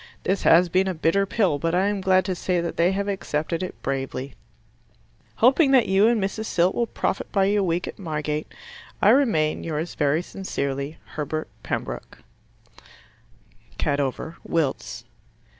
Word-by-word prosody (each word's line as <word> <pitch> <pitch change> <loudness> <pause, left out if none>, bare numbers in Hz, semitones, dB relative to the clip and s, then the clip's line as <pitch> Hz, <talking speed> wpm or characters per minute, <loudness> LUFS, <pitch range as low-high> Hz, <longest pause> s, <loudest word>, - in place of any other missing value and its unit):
This 195 +1 0
has 175 +2 +6
been 185 +3 +2
a 185 - -1
bitter 165 +5 +1
pill, 190 -9 +1
but 165 +2 0
I 185 +2 +3
am 205 -1 -1
glad 185 0 +3
to 190 - -1
say 180 0 -1
that 170 -1 -3
they 170 +2 +3
have 200 +1 -2
accepted 165 -4 -2
it 185 - -5
bravely. 135 0 -3 1.0
Hoping 270 +5 +4
that 255 -4 +5
you 195 +3 +4
and 235 -1 +3
Mrs. 200 +3 -2
Silt 180 -2 +2
will 235 - 0
profit 200 - -2
by 195 -2 +3
your 205 +1 +2
week 175 -1 0
at - - -8
Margate. 150 -3 -3 0.5
I 200 - +5
remain, 220 - +3
yours 160 +1 -3
very 150 +3 +1
sincerely, 140 -6 -4 0.2
Herbert 155 +1 -3
Pembroke - - -5 1.6
Cadover, 145 +3 -2
Wilts. 160 -5 -2
175 Hz, 155 wpm, -24 LUFS, 155-195 Hz, 1.6 s, has